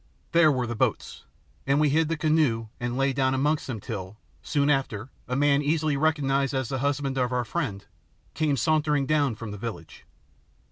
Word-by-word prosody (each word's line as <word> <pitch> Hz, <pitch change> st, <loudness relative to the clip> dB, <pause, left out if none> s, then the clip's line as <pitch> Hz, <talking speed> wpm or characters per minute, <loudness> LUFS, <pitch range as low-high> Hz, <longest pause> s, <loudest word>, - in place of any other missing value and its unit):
There 165 Hz, -2 st, +5 dB
were 130 Hz, -3 st, 0 dB
the 120 Hz, -, -3 dB
boats, -, -, -2 dB, 0.4 s
and 140 Hz, +1 st, +3 dB
we 150 Hz, -1 st, +3 dB
hid 160 Hz, +2 st, +2 dB
the 165 Hz, -, -1 dB
canoe 150 Hz, -8 st, +1 dB
and 120 Hz, +1 st, -3 dB
lay 135 Hz, 0 st, +2 dB
down 130 Hz, 0 st, +1 dB
amongst 145 Hz, +3 st, 0 dB
them 120 Hz, -5 st, -4 dB
till, 100 Hz, -1 st, -6 dB, 0.2 s
soon 145 Hz, -2 st, 0 dB
after, 135 Hz, -5 st, 0 dB, 0.2 s
a 125 Hz, -, -2 dB
man, 140 Hz, +1 st, +3 dB
easily 150 Hz, 0 st, +1 dB
recognised 140 Hz, -2 st, +1 dB
as 130 Hz, -3 st, -1 dB
the 135 Hz, -, -2 dB
husband 140 Hz, -1 st, -1 dB
of 125 Hz, -1 st, 0 dB
our 125 Hz, -1 st, 0 dB
friend, 115 Hz, -, -3 dB, 0.5 s
came 150 Hz, -3 st, 0 dB
sauntering 150 Hz, +1 st, +2 dB
down 145 Hz, -4 st, +1 dB
from 110 Hz, -1 st, -7 dB
the 105 Hz, -, -7 dB
village. 100 Hz, -7 st, -7 dB
135 Hz, 185 wpm, -26 LUFS, 120-150 Hz, 0.5 s, There